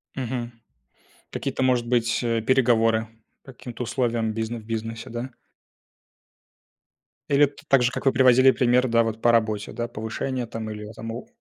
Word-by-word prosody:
Мгм. 120 -2 -4 0.8
Какие-то - - -3
может 125 -2 +2
быть, 120 0 +1
э, 115 -1 0
переговоры? 115 -2 +2 0.4
По 135 - -12
каким-то 125 0 -7
условиям 115 -2 -1
бизне 115 +1 -3
в 110 - -15
бизнесе, 115 0 -5
да? 120 +3 -5 2.0
Или 145 +1 +5
т 140 0 -15
так 135 -3 +4
же, 125 - +2
как - - -6
вы 135 - +4
приводили 130 0 +6
пример, 125 0 +2
да 115 -1 +3
вот, 115 0 -4
по 120 - +4
работе, 110 -3 0
да, 120 - -3
повышение, 120 +3 -4
там, 115 -1 -6
или 105 0 -7
это 110 0 -11
мов 115 +2 -6
120 Hz, 165 wpm, -24 LUFS, 115-125 Hz, 2.0 s, приводили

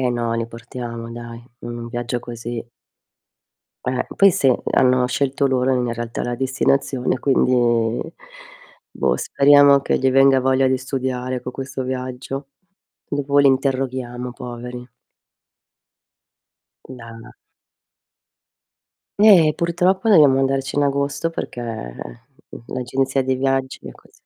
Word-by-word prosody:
Eh 125 -1 +1
no 120 0 -2
li 115 0 -2
portiamo 115 0 -8
dai, 115 0 -9 0.2
un 120 0 -7
viaggio 120 +1 -3
così. 120 -1 -6 1.2
Eh, 125 0 -2
poi 195 0 +6
sì, 135 -5 +3 0.2
hanno 125 -1 +3
scelto 140 +2 0
loro 130 0 +1
in 125 -2 0
realtà 115 0 -5
la 120 0 -2
destinazione 130 0 0
quindi 135 -2 +2 1.4
boh - - 0
speriamo 140 0 +5
che - - 0
gli 130 0 +2
venga 135 0 +5
voglia 130 +1 +2
di 130 0 +2
studiare 130 -1 -3
co' 125 - -6
questo 135 0 -5
viaggio. 130 +2 -5 0.6
Dopo 145 0 0
li 140 - +5
interroghiamo 130 -2 -1
poveri. 125 0 -8 2.0
Da 115 -1 -11 1.9
Eh, 185 -8 +6
purtroppo, 180 +5 +1
dobbiamo 145 -8 +6
andarci 135 0 -1
in 145 - +3
agosto, 140 +3 -1
perché, 125 -6 -6
mhmm, 60 - -9
l'agenzia 130 +2 -1
dei 130 0 -1
viaggi 135 0 -1
è - - -7
così. - - -22
130 Hz, 120 wpm, -20 LUFS, 120-135 Hz, 2.0 s, poi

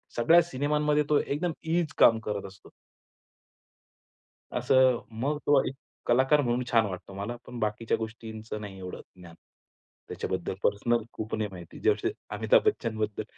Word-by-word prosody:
सगळ्या 165 +9 +6
सिनेमांमध्ये 150 +2 +1
तो 150 - +4
एकदम 165 +5 -1 0.2
ईज 165 -3 0
काम 115 -1 +6
करत 105 -2 -2
असतो. 95 0 -16 1.9
असं 130 -2 +4 0.2
मग 145 +3 0
तो 145 -2 +5
एक 135 - -4 0.3
कलाकार 135 +5 +4
म्हणून 125 -1 0
छान 115 -2 +4
वाटतो 95 0 -7
मला, 100 +5 -4
पण 120 -1 -8
बाकीच्या 110 +1 0
गोष्टींचं 110 -1 -6
नाही 100 -2 -8
एवढं 90 -1 -7 0.2
ज्ञान. 85 -2 -13 0.7
त्याच्याबद्दल 95 -1 -3
पर्सनल 115 +3 +1
खूप 110 0 -4
नाही 105 -2 -2
माहिती. 90 -2 -10
जसे 405 -3 +2 0.2
अमिताभ - - +4
बच्चनबद्दल 110 - -1
115 Hz, 140 wpm, -28 LUFS, 105-145 Hz, 1.9 s, सगळ्या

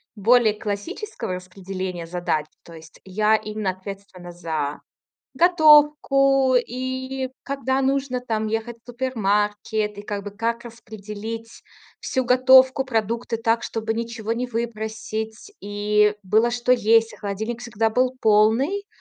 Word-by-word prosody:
более 225 +1 +4
классического 210 - -5
распределения 185 -1 -6
задач. 165 -3 -2 0.2
То 170 - -14
есть 160 -1 -14
я 210 +3 +2
именно 215 -2 -2
ответственна 190 -1 -10
за 160 -4 -4 0.6
готовку. 295 -5 +5
И 260 +2 -3
когда 270 -1 -1
нужно 270 -1 0
там 220 -3 -2
ехать 225 +2 -3
в - - -44
супермаркет, 210 -3 -1
и - - -6
как 205 -1 -4
бы 205 - -7
как 230 +3 -3
распределить 225 0 -8 0.4
всю 260 -1 -1
готовку, 260 +1 +5
продукты 230 -1 -2
так, 225 +1 0
чтобы 225 0 -3
ничего 230 -1 -3
не 245 +2 -2
выбросить. 220 - -5
И 210 +1 +1
было 220 +5 +2
что 245 0 -2
есть, 225 -1 +3
и - - -12
холодильник 220 +3 -4
всегда 225 -2 -1
был 255 +3 +1
полный. 225 - +3
225 Hz, 125 wpm, -23 LUFS, 205-250 Hz, 0.6 s, готовку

